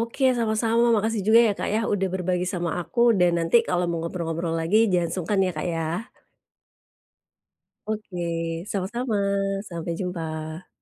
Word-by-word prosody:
Oke. 235 +4 -2
Sama-sama, 230 +1 +2
makasih 220 -1 0
juga 225 +2 +7
ya - - +2
Kak - - -2
yah, 225 +1 +1
udah 190 -1 0
berbagi 180 -1 -1
sama 175 -1 -1
aku 235 +7 +1 0.2
dan 175 -1 +5
nanti 165 +7 +3
kalau 180 0 +1
mau 170 - -2
ngobrol-ngobrol 165 -1 -3
lagi, 205 +7 +3
jangan 170 -2 +1
sungkan 195 +3 0
ya 180 - -1
Kak, 155 - -2
ya. 160 -1 -2 2.0
Oke. 210 -4 -4 0.5
Sama-sama, 215 +4 -2 0.5
sampai 170 -1 -4
jumpa. 160 -2 -5
185 Hz, 145 wpm, -25 LUFS, 170-220 Hz, 2.0 s, juga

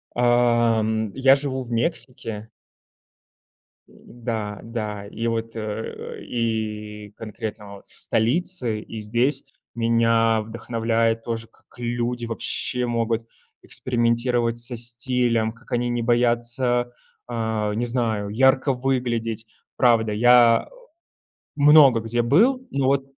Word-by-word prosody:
Эм 115 -3 +2
я 135 0 +6
живу 135 -2 -3
в 120 - -11
Мексике. 115 -4 -3 1.4
М - - -22 0.3
да, 105 -3 -3
да, 105 -3 -5
и 115 +3 -4
вот, 115 0 -3
э - - -4
э 110 +1 -6
и 105 -3 -3
конкретно 105 -2 -7
вот - - -15
в - - -14
столице, 120 -1 0
и 110 - -8
здесь 120 +6 0 0.3
меня 115 -1 +2
вдохновляет 115 0 -1
тоже, 115 -1 -4
к - - -41 0.2
как - - -20
люди 120 0 -2
вообще 125 +2 -2
могут 115 -1 -1 0.4
экспериментировать 120 -1 0
со 120 +1 -3
стилем. 120 -1 0
Как 115 +1 -21
они 120 0 0
не 120 0 -1
боятся, 120 +1 +1 0.4
а 110 -3 -2
не 120 +2 -1
знаю, 115 -4 -1
ярко 130 +5 +3
выглядеть. 120 -3 -2 0.3
Правда, 115 -3 +3
я 120 +1 +5
о - - -18 0.9
много 145 -4 +7
где 115 +2 -1
был, 240 - +3
но 140 -1 0
вот 135 0 +2
115 Hz, 120 wpm, -23 LUFS, 110-125 Hz, 1.4 s, много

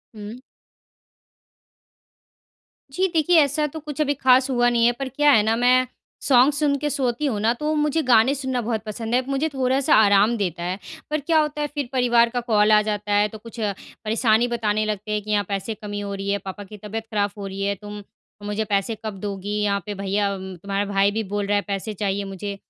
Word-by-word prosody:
हुँ। 210 +3 -8 2.5
जी 370 +7 +1
देखिए। 330 +1 +4
ऐसा 295 +1 +1
तो 315 +2 -8
कुछ 300 -1 -8
अभी 290 -1 +1
ख़ास 260 -1 +3
हुआ 245 -2 +3
नहीं 235 -1 +2
है। 240 - +5
पर 270 -1 -3
क्या 295 +3 +3
है 220 - +6
ना 220 +1 +1
मैं 250 +2 +3 0.3
सॉन्ग 265 +2 +4
सुन 285 0 +1
के 295 +2 -2
सोती 270 -1 -1
हूँ 235 -7 -1
ना 225 +2 +3
तो 300 +1 -1
मुझे 300 +1 +1
गाने 250 +1 +4
सुनना 260 -2 -2
बहुत 225 -1 -2
पसंद 225 +2 -3
है। 255 - +3
मुझे 275 +3 0
थोड़ा-सा 265 +1 +2
आराम 210 +2 +5
देता 180 -4 -3
है। 180 +3 -3 0.3
पर 305 0 0
क्या 315 +2 +2
होता 300 -1 -1
है 295 - 0
फिर 285 -4 -3
परिवार 240 -2 +3
का 245 +1 -2
कॉल 210 -2 +4
आ 210 0 +6
जाता 210 -1 -3
है। 205 +1 +4
तो 220 - -9
कुछ 230 +2 -12
परेशानी 220 +2 0
बताने 215 -3 0
लगते 210 0 -4
हैं 210 0 0
कि 215 - -5
यहाँ 205 -1 +2
पैसे 200 +2 -3
कमी 205 -1 -6
हो 200 -1 -5
रही 195 0 -4
है, 200 - +1
पापा 195 +1 -8
की 210 +2 -12
तबीयत 210 +2 -6
ख़राब 205 -1 +1
हो 200 -1 -5
रही 195 0 -6
है, 200 0 0
तुम 205 +1 -9 0.4
मुझे 210 +1 -2
पैसे 200 +2 -1
कब 205 -3 -5
दोगी? 200 0 -4
यहाँ 200 -1 +1
पे 210 - -4
भैया 200 +1 -1
तुम्हारा 190 +2 -4
भाई 200 0 +3
भी 220 +2 -2
बोल 205 0 -3
रहा 205 - +1
है 205 - +2
पैसे 200 +2 -3
चाहिए 200 0 -2
मुझे। 195 +1 -6
220 Hz, 215 wpm, -23 LUFS, 205-260 Hz, 2.5 s, है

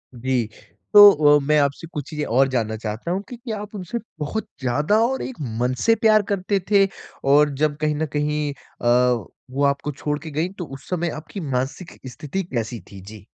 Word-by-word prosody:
जी, 125 0 0 0.5
तो 205 0 +11 0.3
अ, - - +1
मैं 150 0 +4
आपसे 140 +3 -1
कुछ 145 -3 -5
चीज़ें 150 -1 -3
और 135 +4 +3
जानना 115 -4 -1
चाहता 110 +8 -4
हूँ 190 +2 -1
कि 245 - -7
क्या 225 -3 -5
आप 210 +1 -9
उनसे 190 +3 -4 0.2
बहुत 155 +9 -3
ज़्यादा 145 - +1
और 265 +2 -1
एक 260 - -5 0.2
मन 125 +1 +1
से 225 - +5
प्यार 215 -1 +4
करते 195 0 0
थे? 200 -1 +6 0.4
और 145 +2 +5
जब 150 -1 +2
कहीं 150 -1 +1
न 155 +2 -1
कहीं 150 0 0
अ, 125 -2 +1 0.3
वो 140 +2 -1
आपको 140 +1 0
छोड़ 150 +1 -3
के 160 -1 -8
गईं, 160 +5 -1
तो 180 -3 -6
उस 135 -1 -11
समय 175 -1 -1
आपकी 155 +6 -7
मानसिक 140 +3 -4
स्थिति 150 +10 -4
कैसी 120 -7 -4
थी? 100 -1 -10
जी। 100 +1 -12
150 Hz, 195 wpm, -22 LUFS, 130-185 Hz, 0.5 s, तो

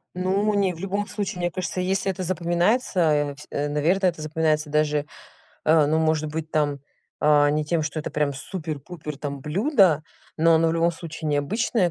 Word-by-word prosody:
Ну, 195 +3 +1
не, 195 -3 +1
в 165 - -12
любом 200 +2 -2
случае, 200 -4 -4
мне 175 0 -1
кажется, 185 +1 -3
если 195 +1 0
это 185 0 -5
запоминается, 180 +5 +1
э, 145 -3 +2
всь 150 - -13
наверно, 150 +7 +1
это 170 -3 -2
запоминается 155 0 0
даже, 150 -1 +1 0.6
а, 155 -2 +5
ну, 160 +2 +2
может 155 -1 +1
быть, 160 0 -5
там, 145 -2 0 0.4
а, 145 -1 +5
не 150 +1 0
тем, 160 +1 0
что 150 +1 -3
это - - -5
прям 150 -1 0
супер-пупер 150 0 -6
там 140 -1 -5
блюдо, 185 - +3 0.3
но 165 +1 +4
оно 165 0 +3
в - - +1
любом 165 +1 +2
случае 160 -1 -6
необычное 180 - +1
160 Hz, 180 wpm, -24 LUFS, 150-185 Hz, 0.6 s, а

